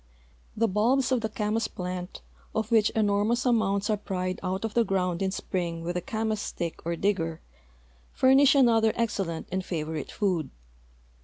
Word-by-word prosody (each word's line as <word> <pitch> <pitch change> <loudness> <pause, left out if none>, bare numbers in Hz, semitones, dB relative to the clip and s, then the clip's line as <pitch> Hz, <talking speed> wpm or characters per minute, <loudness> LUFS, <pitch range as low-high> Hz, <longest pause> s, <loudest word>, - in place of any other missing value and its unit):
The 230 +1 +3
bulbs 240 +6 +2
of 255 -2 +2
the 220 - -2
camas 215 +1 -1
plant, 180 0 -6 0.3
of 220 +1 -1
which 220 -2 +5
enormous 215 +3 +1
amounts 210 -5 +2
are 215 - +1
pried 185 -2 -3
out 190 +3 -2
of 220 - -4
the 235 - +4
ground 180 -3 -1
in 190 - +1
spring 170 -3 -3
with 175 +1 -3
a 180 - -1
camas 220 +1 -2
stick 170 -4 -5
or 170 - 0
digger, 165 -3 -1 0.7
furnish 270 +2 +5
another 225 -5 +4
excellent 195 -8 -2
and 190 +1 -1
favorite 155 -4 -4
food. 180 -9 -1
205 Hz, 160 wpm, -27 LUFS, 180-225 Hz, 0.7 s, which